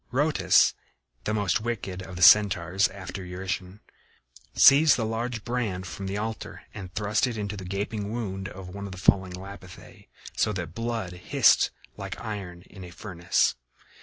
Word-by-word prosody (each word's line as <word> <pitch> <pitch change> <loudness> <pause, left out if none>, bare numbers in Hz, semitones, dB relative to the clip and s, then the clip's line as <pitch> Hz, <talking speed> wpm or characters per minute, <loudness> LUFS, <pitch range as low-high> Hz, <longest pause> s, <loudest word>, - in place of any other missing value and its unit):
Rhoetus, 145 +4 +4 0.5
the 110 - 0
most 100 -1 +1
wicked 100 -5 -4
of 95 -1 -9
the 90 - 0
Centaurs 95 -1 +6
after 95 0 -8
Eurytion, 90 +2 -5 0.7
seized 145 +2 +7
the 115 - -1
largest 115 0 -3
brand 115 -7 -2
from 95 +2 -6
the 100 +1 -3
altar 110 +1 -5
and 95 -4 -8
thrust 105 +4 +1
it 120 -3 -4
into 105 0 -3
the 95 -2 -8
gaping 100 +2 -3
wound 100 -4 -4
of 95 -2 -10
one 100 +2 -7
of 95 - -8
the - - -9
fallen 95 0 +2
Lapithæ, 95 0 -11 0.3
so 110 - +1
that 95 - -2
the 115 - -7
blood 115 -6 -3
hissed 90 - +3 0.3
like - - -6
iron 95 -5 -6
in 95 -1 -13
a 90 - -9
furnace. 90 -1 0
100 Hz, 165 wpm, -26 LUFS, 95-110 Hz, 0.7 s, seized